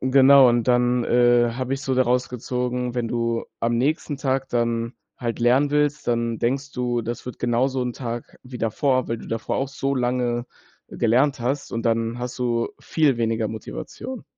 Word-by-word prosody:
Genau 135 0 +7
und 120 -1 +2
dann, 125 0 +3
äh, 120 0 +4
habe 130 +2 -3
ich 135 - -6
so 135 - 0
daraus 125 0 +2
gezogen, 125 0 -3
wenn 120 -2 -1
du 115 -1 -1 0.2
am 115 0 +1
nächsten 145 +3 0
Tag 135 0 -1
dann 115 -1 -1 0.2
halt 120 -2 -3
lernen 125 +4 +3
willst, 150 0 +1
dann 115 -1 0
denkst 135 +3 -1
du, 125 -1 -1
das 120 +1 -5
wird 125 - -7
genauso 125 +2 +1
'n 125 0 -2
Tag 120 -1 -6
wie 125 -1 -9
davor, 130 +3 +1
weil 115 - -2
du - - -11
davor 115 0 -2
auch 135 - -1
so 135 0 -2
lange 125 -1 0 0.4
gelernt 125 +4 +2
hast 135 +4 -2
und 115 - -2
dann 115 0 0
hast 125 +1 -5
du 120 -2 0
viel 150 -5 +2
weniger 115 -1 0
Motivation. 240 - -7
125 Hz, 180 wpm, -23 LUFS, 120-130 Hz, 0.4 s, Genau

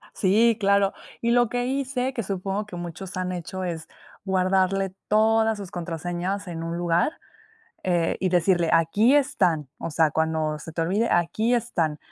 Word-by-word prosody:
Sí, 220 +4 +3
claro. 200 -1 +3 0.3
Y 235 0 +1
lo 240 0 +4
que 245 0 -1
hice, 265 -1 -1
que 235 - -3
supongo 195 +1 -3
que 205 - -9
muchos 175 +2 -7
han 185 0 -2
hecho, 180 +2 -5
es 165 -3 -4 0.4
guardarle 190 0 +1
todas 220 +1 +3
sus 200 -3 -8
contraseñas 175 +3 -3
en 165 -1 -5
un 165 +1 -3
lugar, 175 - +1 0.7
eh, 175 -2 +1
y 190 - +1
decirle: 175 -1 +2
"Aquí 205 - +4
están, 180 - +1
o - - -4
sea, 160 0 +3
cuando 160 -1 0
se 165 - -8
te 165 - -3
olvide, 200 +8 +1
aquí 195 +8 +2
están". 170 -11 -1
185 Hz, 165 wpm, -25 LUFS, 170-215 Hz, 0.7 s, lo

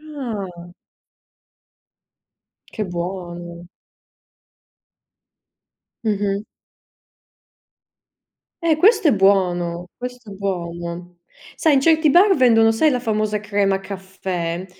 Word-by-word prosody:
Ah. 210 - -7 2.0
Che 215 - -4
buono. 175 -1 -6 2.4
Mh-mh. 205 -2 -1 2.2
Eh 320 -2 +3
questo 410 -1 +5
è - - +3
buono. 180 -3 +1
Questo 250 -3 -8
è - - -7
buono. 175 -2 -5 0.4
Sai, 315 -4 +2
in 270 - +4
certi 315 0 +4
bar 380 +5 +6
vendono, 225 -3 +5
sai 300 +7 +3
la 250 -2 -1
famosa 215 -2 -1
crema 200 -2 0
caffè, 190 -3 -5
200 Hz, 85 wpm, -20 LUFS, 175-250 Hz, 2.4 s, bar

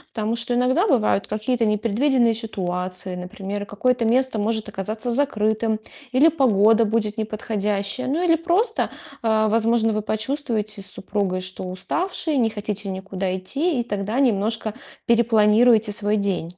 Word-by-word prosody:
Потому 220 +1 -1
что 235 +1 -2
иногда 260 - +2
бывают 215 - +2
какие-то 225 +2 -1
непредвиденные 230 +3 +2
ситуации. 185 -4 -4
Например, 195 +3 -6
какое-то 245 +4 0
место 250 -1 +2
может 220 +1 -1
оказаться 215 +5 -2
закрытым 220 -4 +1 0.3
или 280 +6 +5
погода 225 -6 +4
будет 215 0 -1
неподходящая, 210 +2 -1
ну 320 +7 0
или 330 -2 +4
просто, 370 +8 0 0.3
э, 220 -1 +2
возможно, 225 0 +2
вы 215 - -1
почувствуете 215 -2 -3
с 195 - -5
супругой, 190 -2 -2
что 185 0 -2
уставшие, 310 - -2
не 230 -3 +3
хотите 205 -2 -4
никуда 190 0 -4
идти, 280 - -1
и - - 0
тогда 210 +3 -3
немножко 220 -3 0 0.3
перепланируете 230 0 +4 0.2
свой 205 +1 0
день. 180 -4 -2
220 Hz, 140 wpm, -22 LUFS, 205-245 Hz, 0.3 s, или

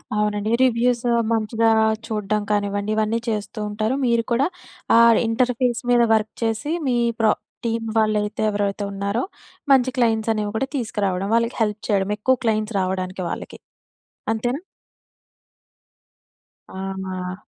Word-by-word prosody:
అవునండి. 210 +1 0
రివ్యూస్ 245 -1 +2 0.3
మంచిగా 225 0 +2 0.4
చూడ్డం 210 -1 -1
కానివ్వండి. 205 0 0
ఇవన్నీ 220 +1 +1
చేస్తూ 215 0 -3
ఉంటారు. 215 +4 -1
మీరు 235 -1 +2
కూడా 265 +5 +3 0.5
ఆ - - +8 0.3
ఇంటర్ఫేస్ 245 +1 +1
మీద 240 -1 +5
వర్క్ 220 0 +1
చేసి, 225 +7 -1 0.2
మీ 245 - +2 0.2
ప్ర 220 -1 +4 0.3
టీమ్ 225 0 -1
వాళ్ళైతే 215 -1 +1
ఎవరైతే 205 0 -1
ఉన్నారో, 200 +4 -1 0.5
మంచి 260 -1 +5
క్లయింట్స్ 225 -2 +2
అనేవి 210 -1 -2
కూడా 265 - -1
తీసుకురావడం. 200 -5 -1
వాళ్ళకి 230 +1 0
హెల్ప్ 210 -1 0
చేయడం. 200 -1 +1
ఎక్కువ 260 +5 +2
క్లయింట్స్ 215 0 0
రావడానికి 185 0 -2
వాళ్ళకి. - - -6 0.8
అంతేనా? 245 +8 -2 2.1
ఆ! 190 -1 -5
215 Hz, 120 wpm, -22 LUFS, 205-230 Hz, 2.1 s, ఆ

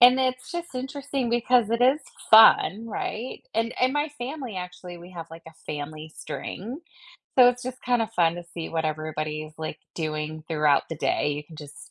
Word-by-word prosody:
and 250 +1 +8
it's 255 -1 -1
just 345 -5 -5
interesting 270 -1 -3
because 240 -1 +3
it 235 - +1
is 260 +5 +5 0.3
fun, 220 -1 +8
right? 230 +2 -4
And 230 +1 0
and 255 +1 +3
my 295 +1 0
family 255 -4 -5
actually 180 -1 -7
we 175 +2 -12
have, 165 -2 -7
like, 165 +1 -11
a 160 - -17
family 155 +1 -6
string, 235 - -6 0.6
so 245 - +10
it's 245 0 -1
just 255 +1 -6
kind 245 -2 +2
of 225 - -4
fun 170 -5 +3
to 175 - -7
see 165 -2 -4
what 160 -1 -1
everybody 155 0 -3
is, 155 - -12
like, 155 -1 -5 0.2
doing 155 -1 -3
throughout 150 -3 +3
the 165 - -5
day, 150 - +1
you 145 +1 -5
can 155 +1 -14
just 145 -1 -11
190 Hz, 195 wpm, -26 LUFS, 155-250 Hz, 0.6 s, so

